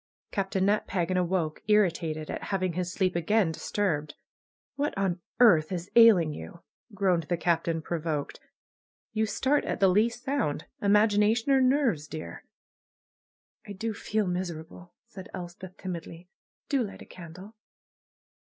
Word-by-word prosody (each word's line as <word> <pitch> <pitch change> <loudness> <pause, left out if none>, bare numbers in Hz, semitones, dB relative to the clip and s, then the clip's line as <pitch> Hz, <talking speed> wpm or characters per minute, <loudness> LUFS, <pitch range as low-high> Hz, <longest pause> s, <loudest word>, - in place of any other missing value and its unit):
Captain 195 -1 0
Nat 210 +1 +1
Pagan 185 -1 -1
awoke, 175 -3 0
irritated 170 -7 +1
at - - -5
having 185 -3 -1
his 180 +1 -2
sleep 185 -1 0
again 180 +1 +2
disturbed. 155 -4 -2 0.6
^^What 290 +1 -1
on 190 -3 0 0.2
earth 170 -11 +5
is 180 0 -4
ailing 205 -10 +7
you?" 170 +3 -9 0.3
groaned 180 -5 +1
the 175 - +1
Captain, 165 -1 0
provoked. 155 -4 -3 0.8
^^You 220 0 +1
start 285 +6 +1
at - - -2
the 195 - +5
least 225 +6 +2
sound. 265 - -1 0.2
Imagina 210 +1 +4
tion 245 +4 -1
or 265 - +4
nerves, 255 - +2
dear?" 155 0 -8 1.2
'H 200 -2 -8
do 225 +2 -2
feel 215 +1 -1
miserable," 175 -1 -5
said 195 -5 -11
Elspeth 180 +1 -9
timidly. 170 -1 -7 0.4
''Do 275 -3 +1
light 205 - -8
a - - -15
candle!" 185 +5 -11
185 Hz, 140 wpm, -28 LUFS, 170-210 Hz, 1.2 s, ailing